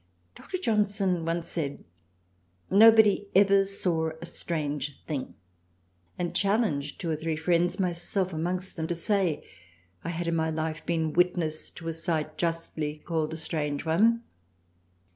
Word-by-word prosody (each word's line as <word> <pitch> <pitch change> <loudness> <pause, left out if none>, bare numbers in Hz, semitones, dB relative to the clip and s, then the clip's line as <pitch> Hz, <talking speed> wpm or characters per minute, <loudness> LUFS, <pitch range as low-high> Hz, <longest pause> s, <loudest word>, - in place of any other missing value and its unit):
Dr. 370 - -6
Johnson 200 - +1
once 165 0 -1
said 150 -5 -4 0.9
nobody 210 -1 +7
ever 195 0 +6
saw 175 -5 0
a 170 - -7
strange 150 -5 -3
thing; 145 -5 -4 0.8
and 175 -1 -2
Challenged 195 -9 +1
two 170 -3 -2
or - - +1
three 160 +1 -2
Friends 175 +3 +1
(myself 180 +1 0
44 160 - -4
THRALIANA - - -2
amongst 185 +1 -4
them) 160 0 -2
to 175 - -1
say 185 -2 0 0.6
I 165 - -3
had 170 0 -3
in 170 0 0
my 160 -1 +1
Life 160 0 -3
been 160 -2 0
Witness 175 -3 +1
to 165 - -12
any 165 - -2
Sight 160 -2 -2
justly 165 -3 -2
called 160 0 -2
a - - -4
Strange 150 -2 -2
one. 225 +9 +3
170 Hz, 150 wpm, -28 LUFS, 160-190 Hz, 0.9 s, nobody